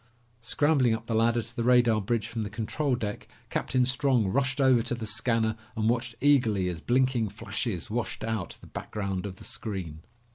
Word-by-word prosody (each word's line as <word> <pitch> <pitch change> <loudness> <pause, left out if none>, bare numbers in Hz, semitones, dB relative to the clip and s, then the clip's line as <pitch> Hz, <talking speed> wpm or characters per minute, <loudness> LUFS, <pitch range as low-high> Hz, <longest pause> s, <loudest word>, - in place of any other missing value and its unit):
Scrambling 130 -1 +3
up 110 0 -8
the 115 - -3
ladder 115 +1 +3
to 115 +3 -8
the 115 - -1
radar 120 -3 +4
bridge 110 +2 0
from 115 -1 -4
the 105 - -3
control 120 +6 -1
deck, 105 -4 -4 0.2
Captain 130 -1 +1
Strong 130 -5 +2
rushed 135 +5 0
over 130 -3 +5
to 120 +1 -2
the 115 -2 -5
scanner 110 +1 +1 0.2
and 110 0 +2
watched 120 0 -1
eagerly 120 -10 +3
as 85 -3 -5
blinking 125 -1 +2
flashes 105 -2 -4
washed 110 -4 -3
out 110 -4 -3
the - - -13
background 100 -2 -4
of 95 - -7
the - - -14
screen. 90 -8 -5
115 Hz, 185 wpm, -28 LUFS, 105-125 Hz, 0.2 s, over